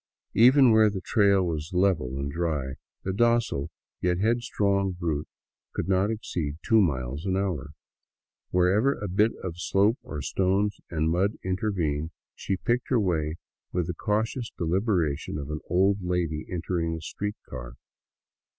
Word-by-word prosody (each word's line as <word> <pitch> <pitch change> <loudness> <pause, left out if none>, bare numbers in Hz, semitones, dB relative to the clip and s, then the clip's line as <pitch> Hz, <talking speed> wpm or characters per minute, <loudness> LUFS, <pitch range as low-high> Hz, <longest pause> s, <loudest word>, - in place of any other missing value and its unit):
Even 130 +2 +7
where 110 -1 +6
the 100 -2 -4
trail 100 -1 +3
was 80 +1 -3
level 90 -9 +1
and 70 +1 -3
dry, 75 -5 -2 0.3
the 95 - -2
docile, 115 -9 +2 0.3
yet 90 0 +1
head 115 +5 +2
strong 100 -4 +1
brute 80 -4 -2 0.5
could - - -3
not 95 +1 +2
exceed 85 -9 -3
two 110 -1 +5
miles 70 -4 -1
an 95 0 +1
hour; 90 -7 -2 0.8
wherever 100 +10 +3
a 105 - -4
bit 105 +5 +3
of 90 -2 -5
slope, 100 +6 +2
or 75 - -6
stones 95 +5 +1
and 80 -1 0
mud 95 +5 +2
intervened, 90 -6 -1 0.2
she 95 - -2
picked 120 +6 -1
her 125 - +3
way 80 -6 0 0.4
with 90 -2 0
the 90 - -3
cautious 110 +6 -1
deliberation 85 -5 0
of 70 0 -5
an 75 - -3
old 95 +3 +3
lady 90 -4 -1
entering 85 -2 -1
a 80 - -7
street 105 +5 -4
car. - - -7
90 Hz, 150 wpm, -27 LUFS, 80-105 Hz, 0.8 s, Even